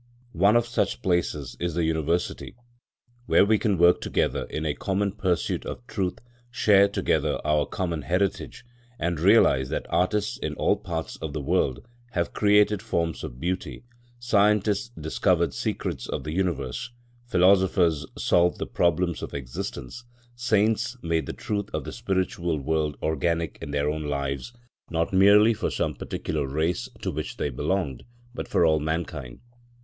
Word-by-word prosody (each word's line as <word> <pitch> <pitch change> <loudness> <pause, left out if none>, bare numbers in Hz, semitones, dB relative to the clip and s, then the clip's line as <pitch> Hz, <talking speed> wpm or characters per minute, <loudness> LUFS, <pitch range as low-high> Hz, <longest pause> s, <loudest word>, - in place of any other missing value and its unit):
One 100 +6 +4
of 120 0 +4
such 120 +1 -1
places 85 -7 -1
is 85 -2 -2
the 85 - +1
University, 80 +2 -1 0.7
where - - +5
we 110 +1 +3
can 105 -4 +1
work 85 +1 +5
together - - 0
in 80 - -4
a 75 - 0
common 100 +4 -1
pursuit 95 -3 -1
of 120 - -7
truth, 95 -7 -2 0.3
share 105 -5 +5
together 100 - 0
our 75 -1 +2
common 85 -5 -3
heritage, 100 - -2 0.3
and 85 -5 -1
realise 80 - +4
that - - -3
artists 100 +5 0
in - - -3
all - - +2
parts 80 -2 -5
of 80 -3 -6
the 75 - -3
world 65 -2 0 0.3
have 85 -1 -1
created 105 -1 +3
forms 85 -1 -2
of - - -7
beauty, 90 - -3 0.3
scientists 105 -2 +2
discovered 85 +1 +1
secrets - - -3
of - - -3
the 75 - -4
universe, 85 - -2 0.4
philosophers 90 -6 +3
solved 90 0 +3
the - - -3
problems 85 0 0
of - - -6
existence, 65 - -6 0.3
saints 115 0 +1
made 80 -1 0
the - - -2
truth 105 -1 -3
of - - -2
the - - -6
spiritual 95 -6 -1
world 75 +1 -1
organic 80 +2 -1
in - - -6
their 70 0 0
own 75 0 -2
lives, 70 - -3 0.4
not 85 +2 -1
merely 100 +4 +6
for - - -2
some - - -1
particular 70 - -3
race 80 +5 -1
to - - -1
which - - -5
they 75 - -1
belonged, 75 0 -2 0.3
but - - -5
for 85 - +3
all 80 -1 +4
mankind. 75 -5 -4
85 Hz, 155 wpm, -26 LUFS, 80-100 Hz, 0.7 s, merely